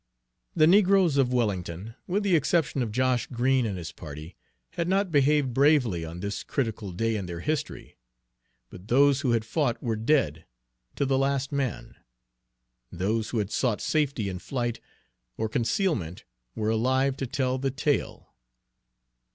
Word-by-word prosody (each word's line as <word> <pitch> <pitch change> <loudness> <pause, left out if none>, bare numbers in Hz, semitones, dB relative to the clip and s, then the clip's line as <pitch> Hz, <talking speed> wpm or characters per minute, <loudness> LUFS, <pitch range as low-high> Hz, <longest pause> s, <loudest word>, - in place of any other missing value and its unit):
The 155 - +5
negroes 185 -3 +4
of 130 -2 +3
Wellington, 100 -4 -2
with 200 +3 0
the 195 -3 +3
exception 155 -2 +1
of 115 -3 -2
Josh 125 0 +1
Green 125 0 +1
and 100 -3 -3
his 85 -2 -6
party, 75 +2 -10 0.4
had 170 - -2
not 190 0 +1
behaved 145 -2 +3
bravely 130 - +3
on 85 +2 -7
this 100 +1 -3
critical 110 -6 -3
day 115 +5 -1
in 100 -4 -4
their 85 -1 -6
history; 150 - -4 0.7
but 90 +3 -12
those 140 +3 +4
who 125 -5 +1
had 115 -1 0
fought 130 -1 0
were 115 -3 -2
dead, 110 - +1 0.5
to 140 - 0
the 135 0 +1
last 135 0 0
man; 135 - -3 0.9
those 105 +5 -1
who 120 - -3
had 105 -1 -1
sought 120 -5 0
safety 140 -9 0
in 95 -2 -4
flight 120 +1 -3 0.6
or 110 - -1
concealment 115 - -1 0.3
were 110 0 -1
alive 130 +4 +1
to 135 - -3
tell 130 +1 -1
the 135 +1 0
tale. 145 +1 -2
125 Hz, 155 wpm, -27 LUFS, 105-140 Hz, 0.9 s, The